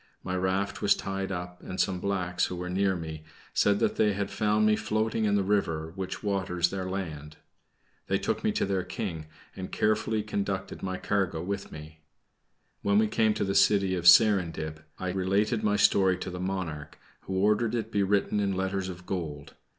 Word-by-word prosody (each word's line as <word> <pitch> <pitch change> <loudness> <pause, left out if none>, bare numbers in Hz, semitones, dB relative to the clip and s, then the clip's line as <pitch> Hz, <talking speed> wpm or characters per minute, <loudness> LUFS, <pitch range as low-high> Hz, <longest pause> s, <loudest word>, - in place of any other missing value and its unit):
My 90 - -3
raft 95 +2 -1
was - - +4
tied 95 0 -4
up 90 -1 -6
and 95 - -7
some 95 -2 +1
blacks, 90 -2 0
who 90 - -5
were 90 0 -5
near 95 +1 +1
me, 80 -2 -6 0.3
said 100 -1 +3
that - - 0
they 105 -1 +3
had 100 0 -3
found 105 0 +2
me 110 0 +4
floating 110 +1 0
in 100 -1 +2
the 100 - +2
river 85 -6 0
which 95 +1 -5
waters 95 -4 0
their 95 -1 -3
land. 75 -6 -5 0.7
They - - +2
took - - -2
me - - +2
to - - +1
their 95 -2 -1
King, 90 -5 -5 0.3
and 95 -1 -6
carefully 110 0 +1
conducted 100 -2 -3
my 95 -1 -3
cargo 95 -6 -1
with 100 +1 -4
me. 75 +1 -10 0.8
When 100 0 +2
we 110 0 +4
came 110 0 +2
to - - -1
the 95 -1 -1
city 100 -2 +4
of 90 -1 0
Serindib, 80 -8 +5
I 95 -1 -3
related 100 +4 +1
my 105 -1 +2
story 95 -3 +4
to 90 - -5
the 90 - -6
monarch, 90 -6 -4 0.3
who 95 - -3
ordered 105 +4 +2
it 115 - 0
to 110 - -19
be 100 - +1
written 100 +1 +1
in 100 -2 0
letters 95 0 -1
of 90 0 -9
gold. 80 -4 -5
95 Hz, 195 wpm, -28 LUFS, 90-100 Hz, 0.8 s, Serindib